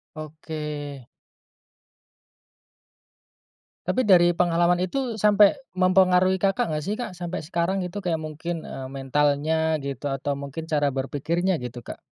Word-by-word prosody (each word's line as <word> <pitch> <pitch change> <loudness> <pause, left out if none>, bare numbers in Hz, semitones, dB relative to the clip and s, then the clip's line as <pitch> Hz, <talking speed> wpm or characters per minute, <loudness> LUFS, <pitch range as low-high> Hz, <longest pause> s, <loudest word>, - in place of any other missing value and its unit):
Oke. 150 -3 -6 2.8
Tapi 210 +6 +1
dari 175 -3 +6
pengalaman 175 0 +2
itu 225 +5 -2
sampai 210 +4 +5 0.2
mempengaruhi, 185 0 +4
Kakak, 195 0 +1
nggak 150 0 -2
sih, 210 - 0
Kak? 240 -3 -5
Sampai 175 -1 -4
sekarang 175 +4 -1
gitu, 180 +3 -5
kayak 180 -4 -1
mungkin, 160 +1 -5
eee, 130 -1 -7
mentalnya 145 +4 +1
gitu 140 0 -4
atau 140 +1 -2
mungkin 140 +3 -6
cara 145 -2 +2
berpikirnya 150 +6 -1
gitu, 120 -1 -7
Kak? - - -8
165 Hz, 125 wpm, -25 LUFS, 145-185 Hz, 2.8 s, dari